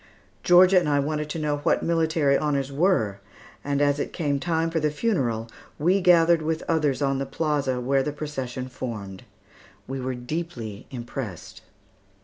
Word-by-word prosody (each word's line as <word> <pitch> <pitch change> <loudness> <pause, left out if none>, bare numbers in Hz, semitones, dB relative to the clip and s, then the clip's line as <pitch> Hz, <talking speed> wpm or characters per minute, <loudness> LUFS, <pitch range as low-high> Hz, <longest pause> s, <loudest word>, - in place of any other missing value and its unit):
Georgia 180 +1 +6
and 165 -4 -2
I 145 -1 +3
wanted 150 +1 -2
to 160 - -4
know 150 -2 -1
what 145 - +1
military 160 -4 +2
honors 140 -2 0
were, 140 - +1 0.4
and 145 0 0
as 145 0 +2
it - - -3
came 145 -5 -1
time 165 +1 0
for 165 - 0
the 155 0 +1
funeral, 135 - -1 0.3
we 180 +6 +2
gathered 170 -2 +5
with 160 +1 -2
others 150 -4 +1
on 135 -1 +1
the 135 - -2
plaza, 140 -3 -1
where 135 +2 +1
the 150 - -2
procession 130 -4 -5
formed. 110 -7 -7 0.6
We 135 0 -4
were 130 0 -3
deeply 125 -5 -5
impressed. 120 - -7
145 Hz, 160 wpm, -25 LUFS, 130-160 Hz, 0.6 s, Georgia